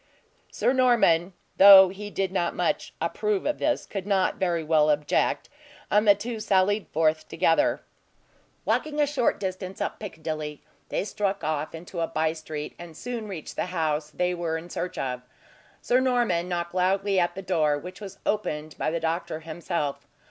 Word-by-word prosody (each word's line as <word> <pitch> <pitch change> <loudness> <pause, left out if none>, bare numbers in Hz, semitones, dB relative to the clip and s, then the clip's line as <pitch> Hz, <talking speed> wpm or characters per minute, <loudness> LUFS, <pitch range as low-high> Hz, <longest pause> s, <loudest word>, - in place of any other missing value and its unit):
Sir 255 - +1
Norman, 225 -9 +3 0.2
though 195 -1 +10
he 205 +2 -7
did 195 -2 -2
not 175 -3 -1
much - - -1
approve 425 -2 -1
of 300 - -1
this, 305 - 0
could 195 -1 -6
not 195 -2 +1
very 175 -3 0
well 155 -1 +3
object, 150 0 +1 0.4
and 210 +1 +3
the 205 - +8
two 225 +3 -5
sallied 205 0 +2
forth 155 0 +1
together. 165 -1 +2 0.8
Walking 300 -1 0
a 295 - +5
short 280 -4 0
distance 185 0 -5
up - - -3
Piccadilly, 155 -6 -5 0.3
they - - -1
struck 200 -1 -2
off 155 0 -2
into 170 +2 -8
a 165 - 0
bye 160 0 0
street, 155 -2 -6
and 170 -2 -10
soon 235 -3 -5
reached 180 -7 -7
the - - -2
house 155 -4 -1
they 180 +3 -1
were 170 -2 -2
in 170 +2 -10
search 180 0 -4
of. 125 -2 -3 0.6
Sir 250 - +3
Norman 240 -10 +1
knocked 170 -1 -3
loudly 190 +2 +2
at 175 -1 0
the 195 - -6
door, 155 -5 +1
which 180 +7 -9
was 195 -1 -8
opened 155 -7 -2
by - - 0
the 165 +1 -1
doctor 165 0 -2
himself. 160 -2 -4
180 Hz, 170 wpm, -26 LUFS, 160-200 Hz, 0.8 s, though